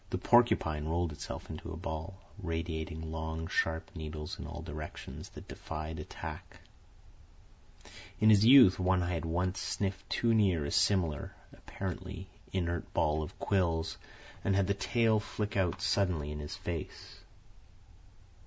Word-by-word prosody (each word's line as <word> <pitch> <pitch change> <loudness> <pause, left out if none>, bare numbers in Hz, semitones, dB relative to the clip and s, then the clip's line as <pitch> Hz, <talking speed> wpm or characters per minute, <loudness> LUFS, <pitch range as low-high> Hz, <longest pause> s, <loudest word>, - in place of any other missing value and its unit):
The - - -1
porcupine 80 -11 +3
rolled 85 0 0
itself 75 - -6
into - - -7
a - - -5
ball, 80 +5 -5 0.2
radiating 80 -2 -3
long, 80 0 -3
sharp 80 0 0
needles 75 -2 -5
in - - -5
all - - -7
directions 75 +1 -7
that - - -11
defied 80 0 -5
attack. - - -7 1.6
In 110 +1 +6
his 105 -1 +6
youth 120 -6 +8
One 90 0 +3
Eye 90 +1 -1
had 85 0 -2
once 90 +3 0
sniffed 95 -1 -2
too 115 -1 +2
near 95 -9 +3
a - - -3
similar, 85 -8 +1 0.2
apparently 95 0 -6 0.2
inert 85 -3 -2
ball 75 +1 +2
of 75 - -7
quills, 85 -5 0 0.4
and 95 - +2
had 100 -1 +3
the 100 - +2
tail 115 +1 +2
flick 105 0 -4
out 95 -4 0
suddenly 85 -7 +1
in 75 - -5
his 75 0 -5
face. 80 -7 -6
85 Hz, 145 wpm, -32 LUFS, 80-95 Hz, 1.6 s, youth